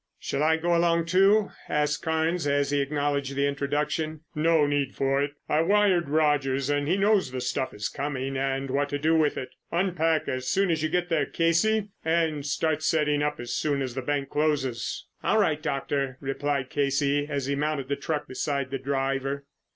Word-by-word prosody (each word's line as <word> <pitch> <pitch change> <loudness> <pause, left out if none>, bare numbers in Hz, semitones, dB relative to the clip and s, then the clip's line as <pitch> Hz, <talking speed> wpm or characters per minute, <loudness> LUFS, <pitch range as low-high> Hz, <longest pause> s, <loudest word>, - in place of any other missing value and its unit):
"Shall 140 - -2
I 160 +1 +3
go 170 +1 +1
along 170 -1 +2
too?" 195 +4 +4 0.2
asked 150 0 0
Carnes 160 0 0
as 140 0 +1
he 145 -1 +2
acknowledged 140 -1 -1
the 140 +1 +1
introduction. 150 +2 -1
"No 160 0 +3
need 145 -2 -1
for 135 0 +1
it. 145 0 -2
I 150 - +2
wired 190 -3 +3
Rogers 145 -3 +1
and 145 0 0
he 180 +5 +2
knows 200 -5 +3
the 130 0 -4
stuff 125 +1 -2
is 105 0 -3
coming 135 +1 -3
and 135 0 -1
what 140 +1 0
to 145 - -1
do 160 +3 +2
with 155 -2 +2
it. 130 - -4 0.2
Unpack 170 -3 +1
as 130 0 -3
soon 195 -2 +2
as 160 -2 0
you 155 - 0
get 175 +1 0
there, 150 -4 +1
Casey, 205 +6 +1
and 160 -2 +1
start 155 +2 0
setting 150 -2 +1
up 150 0 -1
as 120 0 -5
soon 145 -2 0
as 130 -2 -4
the 130 - -3
bank 140 +1 -2
closes." 135 -6 -1 0.2
"All - - +2
right, 155 -7 +2
Doctor," 135 -2 -2
replied 140 -1 -2
Casey 140 0 +1
as 140 -3 -2
he 140 - -1
mounted 145 -1 -1
the 140 - 0
truck 145 +1 -3
beside 140 0 -2
the 135 - -2
driver. 135 +1 -2
145 Hz, 190 wpm, -26 LUFS, 140-160 Hz, 0.2 s, too